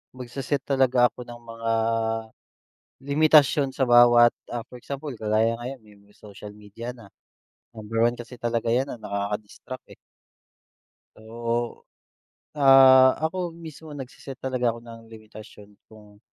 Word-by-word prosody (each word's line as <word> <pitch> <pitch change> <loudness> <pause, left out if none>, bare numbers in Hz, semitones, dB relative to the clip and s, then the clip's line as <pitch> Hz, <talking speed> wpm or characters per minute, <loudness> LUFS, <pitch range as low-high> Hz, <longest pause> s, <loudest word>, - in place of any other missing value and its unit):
Magse-set 130 +2 -4
talaga 130 -3 +2
ako 125 - -11
ng 120 - -9
mga 115 -1 -6 1.3
limitasyon 145 -1 +3
sa - - -2
bawat, 120 -1 +6 0.2
ah, 120 -1 -3
for 125 - -11
example 140 +4 -7
kagaya 110 +2 0
ngayon 125 +2 -7 0.3
may 105 - -25
social 105 0 -12
media 105 +4 -9
na. 115 -5 -16 0.7
Number 110 +1 -4
one 120 +1 +2
kasi 120 0 -11
talaga 115 -1 -1
'yan 130 +3 +1
na - - -6
nakaka-distract, 105 +4 -6
eh. - - -15 1.2
So. 115 +1 -4 0.7
Ah, 135 -2 +7
ako 175 0 -4
mismo 160 -2 -11
nagse-set 135 0 -9
talaga 125 -2 0
ako - - -10
ng 115 -1 -12
limitasyon 110 -1 -14 0.2
kung. 105 -2 -17
120 Hz, 130 wpm, -24 LUFS, 115-135 Hz, 1.3 s, Ah